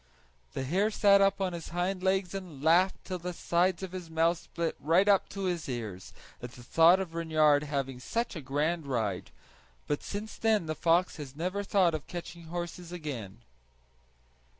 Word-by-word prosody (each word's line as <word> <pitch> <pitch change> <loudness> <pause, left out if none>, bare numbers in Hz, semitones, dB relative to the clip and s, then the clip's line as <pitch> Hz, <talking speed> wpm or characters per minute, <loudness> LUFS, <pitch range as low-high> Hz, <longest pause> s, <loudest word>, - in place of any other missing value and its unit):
The - - -3
hare 190 +10 +1
sat 200 -2 +5
up 195 0 +3
on 185 -2 -1
his 170 -1 -6
hind 180 +2 -1
legs 190 -1 +1
and 175 -8 -7
laughed 175 +4 +3
till 185 -1 -4
the 180 +1 -5
sides 175 +2 +1
of 190 - -5
his 180 -3 -7
mouth 165 +1 +2
split 170 -2 -3
right 170 +7 +3
up 200 -2 +4
to 195 0 -5
his 175 -5 -2
ears, 110 -7 -5 0.3
at 125 0 -7
the 120 - -12
thought 165 +8 +5
of 185 -4 -4
Reynard 155 -3 +3
having 135 -3 -3
such 230 - -2
a 160 - -5
grand 145 +4 -1
ride; 110 - -2 0.6
but 145 - -1
since 210 +2 -6
then 220 -5 +2
the 155 - -2
fox 170 +3 +2
has 140 -3 -8
never 180 +6 -2
thought 190 -4 +3
of 155 -2 -4
catching 175 -1 -7
horses 175 +1 -6
again. 120 - -6
170 Hz, 180 wpm, -30 LUFS, 150-185 Hz, 0.6 s, sat